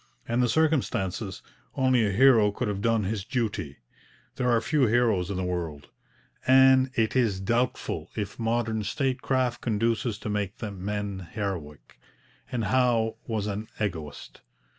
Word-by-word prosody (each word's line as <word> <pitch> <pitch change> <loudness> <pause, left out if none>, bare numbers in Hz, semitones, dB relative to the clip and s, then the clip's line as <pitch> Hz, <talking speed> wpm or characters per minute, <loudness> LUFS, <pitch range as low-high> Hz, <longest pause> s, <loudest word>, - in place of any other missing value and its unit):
In 120 +1 0
the 125 -1 +3
circumstances, 115 - 0 0.3
only 130 -3 +3
a - - 0
hero 115 -1 +5
could 120 +4 -3
have 100 -1 -2
done 115 -1 +2
his 100 0 -2
duty. 105 - -3 0.6
There 125 -1 +1
are 120 -1 +4
few 140 +2 +2
heroes 110 -6 +2
in 100 - -3
the 95 - -1
world, 85 -5 -4 0.6
and 130 0 +6
it 110 +1 +1
is 115 -7 +2
doubtful 120 +6 -1
if 105 0 -4
modern 115 -1 0
statecraft 130 +1 -1
conduces 115 0 0
to 110 - -7
make 105 -1 -2
men 100 -2 -4
heroic. 90 -9 -5 0.5
And 120 -2 -1
Howe 120 -3 +2
was 110 -4 -2
an 105 +1 -4
egoist. 80 -8 -5
110 Hz, 140 wpm, -27 LUFS, 100-125 Hz, 0.6 s, and